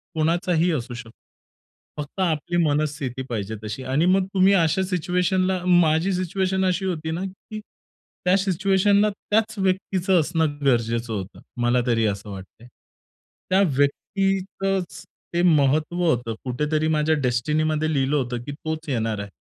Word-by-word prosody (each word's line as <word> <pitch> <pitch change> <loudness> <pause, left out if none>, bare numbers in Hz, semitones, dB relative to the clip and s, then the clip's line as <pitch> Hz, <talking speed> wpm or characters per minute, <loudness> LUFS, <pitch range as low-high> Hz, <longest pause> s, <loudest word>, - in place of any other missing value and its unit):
कोणाचाही 170 +2 +1
असू 125 -4 -3
शकतो. 115 -1 -9 0.9
फक्त 150 +6 -7
आपली 170 0 0
मनस्थिती 145 -4 -1
पाहिजे 110 -1 -3
तशी. 110 +5 -5
आणि 135 +6 +1
मग 195 -1 +1
तुम्ही 190 +1 +5
अशा 170 0 +2
सिच्युएशनला 185 +1 0
माझी 175 0 +3
सिच्युएशन 190 +1 0
अशी 185 +1 0
होती 160 -3 -2
ना, 170 +3 -3
की 195 +3 -9 0.7
त्या 180 +1 +4
सिच्युएशनला 195 +2 +2
त्याच 215 +2 -1
व्यक्तीचं 190 -1 +1
असणं 160 -2 0
गरजेचं 115 -2 +1
होतं, 95 -2 -6 0.2
मला 120 +1 +2
तरी 115 -2 +2
असं 100 0 -3
वाटतंय. 100 +5 -11 0.8
त्या 190 +1 +4 0.2
व्यक्तीतचं 195 +5 0 0.5
ते 175 - +1
महत्त्व 155 -1 +3
होतं, 120 -8 +1
कुठेतरी 150 +5 0
माझ्या 155 +1 +2
डेस्टिनीमध्ये 155 +4 0
लिहिलं 135 +1 +1
होतं, 125 -4 -1
की 145 - -6
तोच 155 +2 -5
येणार 115 -5 -1
आहे. 100 -1 -7
155 Hz, 135 wpm, -23 LUFS, 130-185 Hz, 0.9 s, तुम्ही